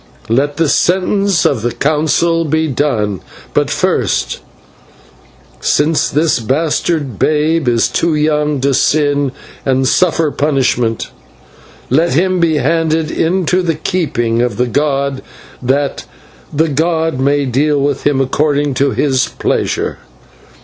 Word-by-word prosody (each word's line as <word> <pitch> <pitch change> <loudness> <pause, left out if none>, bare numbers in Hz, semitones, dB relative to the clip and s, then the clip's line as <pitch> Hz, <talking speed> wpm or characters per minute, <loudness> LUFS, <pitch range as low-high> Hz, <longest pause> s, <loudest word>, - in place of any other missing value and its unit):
Let 140 +5 +1
the 165 -1 +2
sentence 190 +2 +1
of 125 -6 +1
the 120 +2 -1
Council 155 +4 +1
be 160 +1 0
done. 115 - -1 0.3
But - - +1
first, - - 0 1.2
since 150 +2 +1
this 155 -1 +1
bastard 145 - -1
babe 155 -1 +1
is 120 -1 +2
too 165 -2 0
young 150 -1 0
to 140 +1 +1
sin 145 0 +1 0.3
and 130 -1 +1
suffer 165 -1 +2
punishment, 130 -6 0 0.8
let 160 +4 +2
him 185 +3 +1
be 165 -2 +2
handed 160 +2 0
into 180 +2 +1
the 165 -3 -1
keeping 125 -9 -1
of 120 -4 -1
the 125 - +2
god, 140 +1 -1 0.4
that 135 +3 -1 0.5
the 160 +3 +1
god 160 -1 0
may 140 +1 +1
deal 145 +3 +1
with 140 -1 -1
him 145 -2 +1
according 145 +1 0
to 140 +2 +1
his 135 -1 +1
pleasure." - - -2
145 Hz, 125 wpm, -14 LUFS, 135-160 Hz, 1.2 s, the